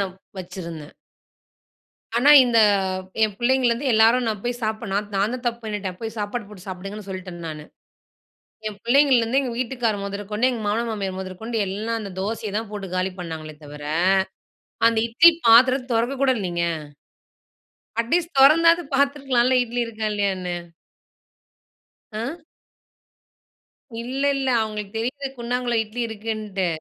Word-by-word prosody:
நான் 190 -2 -2 0.3
வச்சுருந்தேன். 170 -4 -8 1.2
ஆனா, 275 +5 +5 0.2
இந்த 235 -2 +2 0.7
என் 210 -2 0
பிள்ளைங்கலந்து 255 +1 +2
எல்லாரும் 225 +3 +5
நான் 215 -3 -2
போய் 245 0 -3
சாப்புடுளா 215 -2 -2 0.2
நான்தான் 230 +6 -1
தப்பு 235 0 -1
பண்ணிட்டேன், 200 -4 -4
போய் 225 0 -5
சாப்பாடு 210 +2 -3
போட்டு 195 -2 -13
சாப்டுங்கன்னு 195 +2 -7
சொல்ட்டேன் 185 -2 -7
நானு. 150 -1 -7 1.0
என் 210 -2 -7
பிள்ளைங்கலந்து 255 -1 +4
எங்க 255 -3 -3
வீட்டுக்காரு 240 -4 -1
மொதற்கொண்டு, 205 +4 -1
எங்க 230 -3 -4
மாமனார் 230 +3 0
மாமியார் 195 -3 -3
மொதற்கொண்டு, 205 +5 -5
எல்லாம் 220 +4 -3
அந்த 200 -3 -6
தோசைய 215 0 -3
தான் 220 -2 -4
போட்டு 200 -2 -5
காலி 185 +1 0
பண்ணாங்களே 160 -3 -6
தவிர, 145 0 -10 1.1
அந்த 230 -1 0
இட்லி 330 +9 +7
பாத்திரத் 255 +2 +6
தொறக்கக்கூட 260 +4 +2
இல்லைங்க. 175 -4 -1 1.4
அட்லீஸ்ட் 335 +9 0
தொறந்தாது 330 +5 +6
பாத்துருக்கலான்ல, 270 -3 +2
இட்லி 245 0 -3
இருக்கா 220 -1 -4
இல்லையான்னு. 190 -3 -1 1.6
அ? 270 +10 -5 1.6
இல்ல, 260 +3 -4
இல்ல. 270 -1 -2
அவங்களுக்கு 210 -2 -4
தெரியுது, 265 +5 -3
குண்டாங்குள்ள 240 0 -1
இட்லி 220 +3 -6
இருக்குன்ட்டு. 215 -3 -3
225 Hz, 125 wpm, -23 LUFS, 195-245 Hz, 1.6 s, இட்லி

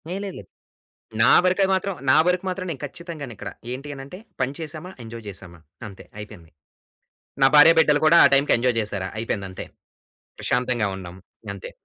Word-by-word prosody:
ఏ - - -3
లేదు 195 - -6
లేదు. - - -14 0.7
నా - - +6
వరుకయి 185 +1 +2
మాత్రం 195 +1 -2 0.2
నా - - +6
వరకు 180 +1 +1
మాత్రం 185 0 -4
నేను 140 -5 -6
ఖచ్చితంగానే 155 -3 -8
ఇక్కడ. 100 - -7 0.2
ఏంటి 140 +3 -7
అనంటే, 135 +7 -10 0.2
పని 130 +1 0
చేశామా? 160 +3 -7
ఎంజాయ్ 115 0 -9
చేశామా? 90 -4 -11 0.3
అంతే 100 - -13
అయిపోయింది. 105 -6 -11 0.9
నా - - +8
భార్య, 150 +3 +9
బిడ్డలు 150 -2 +4
కూడా 165 - +6
ఆ - - +8
టైంకి 140 +1 +3
ఎంజాయ్ 120 -1 +1
చేశారా? 100 -3 -4
అయిపోయిందంతే. 100 -4 -5 0.7
ప్రశాంతంగా 125 -4 0
ఉన్నాం. 90 -2 -9 0.4
అంతే. 95 - -9
130 Hz, 160 wpm, -23 LUFS, 105-165 Hz, 0.9 s, భార్య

